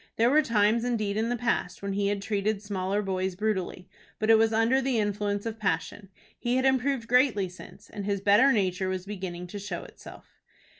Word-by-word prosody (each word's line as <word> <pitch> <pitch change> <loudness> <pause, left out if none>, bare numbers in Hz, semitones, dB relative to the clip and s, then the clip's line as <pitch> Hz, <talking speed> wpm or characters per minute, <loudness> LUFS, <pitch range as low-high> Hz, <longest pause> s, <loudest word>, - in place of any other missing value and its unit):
There 235 +2 +3
were 305 +2 +5
times 230 -3 +2
indeed 215 -5 -1
in 220 +2 0
the 245 - -1
past 225 -6 -2
when 200 0 -2
he 200 0 0
had 200 -1 -1
treated 205 0 -1
smaller 200 0 -2
boys 190 -1 -2
brutally, 190 -3 -2 0.3
but 215 +1 +2
it 225 - +7
was 225 0 +3
under 225 +4 +3
the 260 -2 0
influence 205 -1 -1
of 225 -1 -5
passion. 195 0 -2 0.3
He 240 +1 0
had 260 +1 +1
improved 265 -2 +1
greatly 245 -6 +3
since, 180 +1 -13
and 205 -2 -7
his 200 0 -1
better 205 +7 +5
nature 190 -4 0
was 185 -1 -3
beginning 185 -3 -6
to 205 +3 -7
show 205 +1 -5
itself. - - -14
205 Hz, 200 wpm, -27 LUFS, 195-230 Hz, 0.3 s, it